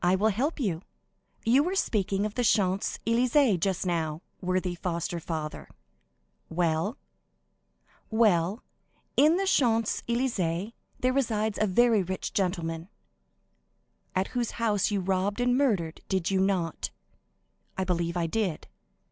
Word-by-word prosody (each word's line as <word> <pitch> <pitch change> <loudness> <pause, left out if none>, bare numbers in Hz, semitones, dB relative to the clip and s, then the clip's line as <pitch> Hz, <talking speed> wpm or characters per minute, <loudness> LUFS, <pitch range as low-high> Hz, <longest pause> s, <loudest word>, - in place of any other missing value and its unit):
"I 180 +1 +4
will 210 +3 +3
help 275 - -1
you. 185 - -1 0.6
You 245 +5 +5
were 360 +5 -1
speaking 200 - 0
of 210 - -3
the 245 - -1
Champs 195 -4 +2
Élysées 235 - +3
just 190 +1 0
now, 160 -2 -1 0.2
worthy 185 0 0
foster 170 0 -3
father." 155 -2 -5 0.8
"Well?" 160 -1 0 1.1
"Well, 210 -2 +2 0.5
in 305 +4 +5
the 390 - 0
Champs 230 - +2
Élysées 220 -5 -1 0.3
there 255 0 +2
resides 220 -5 0
a 215 - +3
very 225 +2 +4
rich 185 +1 -4
gentleman." 170 -3 -2 1.3
"At 185 +1 +1
whose 245 -2 -2
house 210 -4 +1
you 205 -2 0
robbed 195 +3 0
and 245 0 +2
murdered, 200 - +1
did 190 -1 0
you 190 - +2
not?" 185 -4 0 0.9
"I 190 - +1
believe 170 -1 -1
I 170 - +1
did." 185 -1 -2
195 Hz, 130 wpm, -28 LUFS, 175-230 Hz, 1.3 s, You